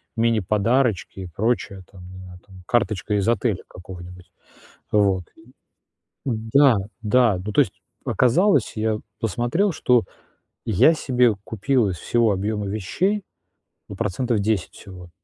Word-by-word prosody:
мини-подарочки 115 -1 +1
и - - -6
прочее. 100 +1 -2
Там, 90 -2 -13
не 95 - -11
знаю, 90 -1 -12
там 95 -2 -15
карточка 105 -3 0
из 100 +1 0
отеля 115 -3 0
какого-нибудь. 90 0 -11 0.6
Вот 100 -4 +2
и 110 - -20 0.8
да, 120 +2 +3 0.3
да. 110 -2 +3
Ну, 105 - -4
то - - +4
есть - - -5 0.3
оказалось, 145 - +2
я 110 0 0 0.2
посмотрел, 120 - 0
что 125 - +2 0.6
я 115 - +4
себе 125 -6 +2
купил 115 +1 0
из 90 - -4
всего 115 +5 +1
объёма 105 +2 -2
вещей, 185 - -1 0.7
ну, 100 - -7
процентов 115 +3 -1
10 100 -3 -1
всего. 90 -3 -12
110 Hz, 130 wpm, -22 LUFS, 95-120 Hz, 0.8 s, то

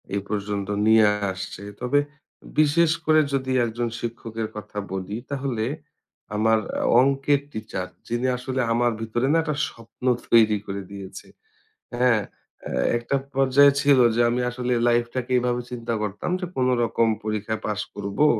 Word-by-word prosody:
এ - - +1
পর্যন্ত 100 -1 -3 0.2
নিয়ে 110 0 +6 0.3
আসছে। 95 +1 -7 0.2
তবে 135 +4 +2 0.6
বিশেষ 155 +2 +4
করে 155 0 +5
যদি 130 -1 -1
একজন 120 +1 -2
শিক্ষকের 115 -1 -4
কথা 105 -1 -9 0.2
বলি 95 +2 -4 0.2
তাহলে 130 -5 -2 0.7
আমার 110 +1 +3 0.4
অংকের 140 +1 +2
টিচার 110 -5 -5 0.2
যিনি 120 +2 -1
আসলে 130 +1 -2
আমার 120 +1 +2
ভিতরে 120 +3 -1
না - - +4
এটা 150 -2 -2
স্বপ্ন 115 +2 -13 0.3
তৈরি 110 -2 +6
করে 100 0 -4
দিয়েছে। 100 -1 -9 0.7
হ্যাঁ? 120 -3 +3 0.8
একটা 120 +4 -2 0.2
পর্যায়ে 135 +1 +5
ছিল 140 -2 +5 0.2
যে 120 - +3
আমি 120 +1 0
আসলে 125 0 -2
লাইফটাকে 120 +1 0
এভাবে 125 0 0
চিন্তা 120 -1 -3
করতাম 105 -1 -3
যে 180 - -3
কোনো 130 0 +2
রকম 115 0 +1 0.2
পরীক্ষায় 110 0 -3
পাস 105 -1 -1
করবো, 100 +7 0
120 Hz, 140 wpm, -24 LUFS, 110-130 Hz, 0.8 s, নিয়ে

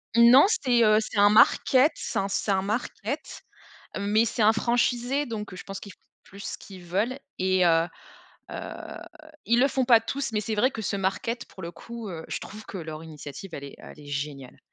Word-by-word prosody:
Non, 235 +5 +8
c'est, 250 - +2
heu, 215 -1 +5
c'est 220 - -5
un 205 0 +7
market. 255 +6 +5
C'est - - -3
un 195 - 0
c'est 200 +1 -1
un 190 -1 +2
market, 215 +5 -4 0.6
mais 205 +3 +2
c'est 230 0 -2
un 215 +1 +6
franchisé. 245 +4 +1
Donc 210 -5 -6
je 185 - -8
pense 195 0 -7
qu'ils 200 - -11
font - - -27 0.3
plus 200 +1 -13
ce - - -5
qu'ils 190 -3 -12
veulent 205 +9 -1 0.2
et 185 -1 +3
heu, 165 0 +4 0.6
heu, - - -6 0.9
ils 235 +1 +3
le 275 - +5
font 265 -1 0
pas 240 -2 +6
tous. 260 +2 -4
Mais 210 - 0
c'est 215 +1 -3
vrai 235 +5 +3
que 230 - -6
ce 200 0 -1
market,, 195 +5 -2
pour 190 - -13
le 170 0 -6
coup, 230 +4 -8
heu, 165 -3 -7
je - - -3
trouve 215 +1 -10
que 195 - -7
leur 160 -2 -7
initiative, 155 +3 -9
elle 140 - -6
est 140 - -9
elle - - -12
est 145 - -13
géniale! 140 -2 -5
210 Hz, 210 wpm, -26 LUFS, 185-235 Hz, 0.9 s, Non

